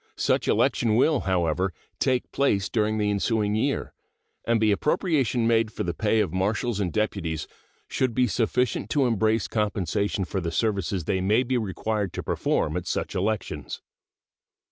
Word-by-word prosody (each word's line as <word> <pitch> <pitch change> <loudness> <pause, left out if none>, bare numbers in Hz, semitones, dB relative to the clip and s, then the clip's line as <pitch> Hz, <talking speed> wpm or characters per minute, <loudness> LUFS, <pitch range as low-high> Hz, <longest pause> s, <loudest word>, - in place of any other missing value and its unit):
Such - - +1
election 110 -3 +2
will, 140 +4 +3
however, 90 +1 +1 0.3
take 130 -2 0
place 100 -8 +1
during 110 -1 0
the 105 -1 +1
ensuing 105 0 0
year, 125 +6 -1 0.5
and 115 -1 +3
the 110 -1 +3
appropriation 135 - +1
made 115 -1 +2
for - - -4
the 85 - -2
pay 110 +4 +1
of 95 -7 -2
marshals 105 +4 0
and 95 -4 -1
deputies 85 -6 -2 0.4
should 130 -3 -1
be 125 - +4
sufficient 120 -1 0
to 135 +3 +2
embrace 110 -2 +1
compensation 100 -2 -1
for 95 +2 -3
the 85 - -2
services 100 -1 -1
they 95 +4 -1
may 105 +6 +3
be 130 +1 -1
required 105 -2 -2
to - - -4
perform - - 0
at - - -5
such - - -2
elections. 105 +3 -3
110 Hz, 160 wpm, -25 LUFS, 95-115 Hz, 0.5 s, be